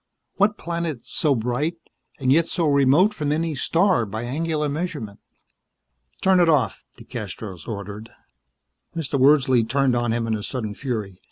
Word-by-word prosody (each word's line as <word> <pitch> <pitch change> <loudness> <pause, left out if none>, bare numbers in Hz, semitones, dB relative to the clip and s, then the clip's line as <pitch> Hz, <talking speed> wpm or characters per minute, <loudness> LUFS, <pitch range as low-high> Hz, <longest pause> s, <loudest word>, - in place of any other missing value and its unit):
What 210 +1 +3
planet 170 -6 -3
so 145 -3 +1
bright, 125 +8 -1 0.4
and 130 -1 +1
yet 165 +2 +3
so 170 -4 -1
remote 145 +8 +4
from 150 -7 -2
any 160 +1 0
star 170 - +2
by 110 +3 -5
angular 150 +4 -1
measurement? 145 - -4 1.0
"Turn 190 -1 +5
it 175 -2 +4
off," 140 -8 +1
DeCastros 95 -7 -7
ordered. 105 +1 -6 0.9
Mr. 145 -4 -2
Wordsley 130 -3 +5
turned 130 +2 +1
on 120 -1 0
him 115 0 0
in 115 - -1
a 105 - -2
sudden 110 -2 -4
fury. 105 -7 -4
135 Hz, 150 wpm, -23 LUFS, 115-165 Hz, 1.0 s, Turn